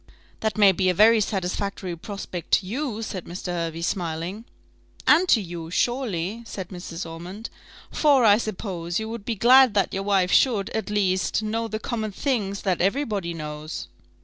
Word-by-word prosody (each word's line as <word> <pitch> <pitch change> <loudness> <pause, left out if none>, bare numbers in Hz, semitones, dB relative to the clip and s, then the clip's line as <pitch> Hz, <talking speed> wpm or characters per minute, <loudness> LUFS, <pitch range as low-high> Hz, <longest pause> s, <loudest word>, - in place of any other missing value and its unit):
"That 220 0 -2
may 205 -2 +7
be 185 0 +1
a 180 - +1
very 220 +3 +6
satisfactory 195 -2 -2
prospect 180 -1 -7
to - - +4
you," 225 +1 -3
said 185 -5 -5
Mr. 180 +1 -6
Hervey, 165 -1 -3
smiling. 175 +4 -3 0.6
"And 345 +5 +5
to 230 - +6
you, 170 -4 -6
surely," 220 -2 -1
said 190 -5 -7
Mrs. 175 -2 -7
Ormond; 180 +7 -8 0.4
"for, 280 -5 +4
I 205 0 +6
suppose, 185 -5 -3
you 220 - -4
would 225 -3 -7
be 230 - -1
glad 245 +2 +6
that 200 - +1
your 195 - -1
wife 195 -2 +2
should, 220 -7 +3
at 220 -1 -3
least, 195 0 +1
know 225 +2 -2
the 215 0 -3
common 220 -1 -3
things 200 -4 -2
that 185 -3 0
every 200 +11 +2
body 195 -9 -3
knows." 150 0 -6
200 Hz, 175 wpm, -24 LUFS, 175-225 Hz, 0.6 s, may